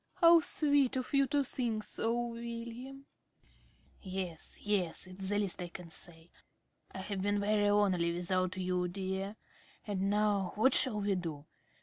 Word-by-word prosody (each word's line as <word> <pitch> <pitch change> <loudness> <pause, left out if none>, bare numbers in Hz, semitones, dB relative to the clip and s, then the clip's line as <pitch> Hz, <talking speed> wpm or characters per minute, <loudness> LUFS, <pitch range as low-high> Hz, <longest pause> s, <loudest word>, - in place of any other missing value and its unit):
~Arabella.~ 340 -2 +7
How 340 - +8
sweet 285 -4 +2
of 255 +1 -3
you 275 -1 +4
to 285 +1 +2
think 235 -5 -1
so, 230 +3 0
William. 235 +3 -7 0.4
~Smith.~ - - -31 0.5
Yes, 185 -4 -4
yes, 195 -6 0
it's 185 +1 -6
the 205 - +1
least 200 -3 -1
I 175 - -3
can 170 -1 -10
say.... 165 0 -7 0.6
I 190 - -6
have 195 0 -3
been 205 +1 +1
very 205 0 +2
lonely 190 -5 +3
without 185 +1 0
you, 180 -1 0
dear.... 190 +2 -3 0.5
And 195 -2 -1
now, 205 -3 +1
what 255 +5 +4
shall 240 -6 +3
we 200 0 +1
do? 165 -6 -4
205 Hz, 160 wpm, -33 LUFS, 185-235 Hz, 0.6 s, How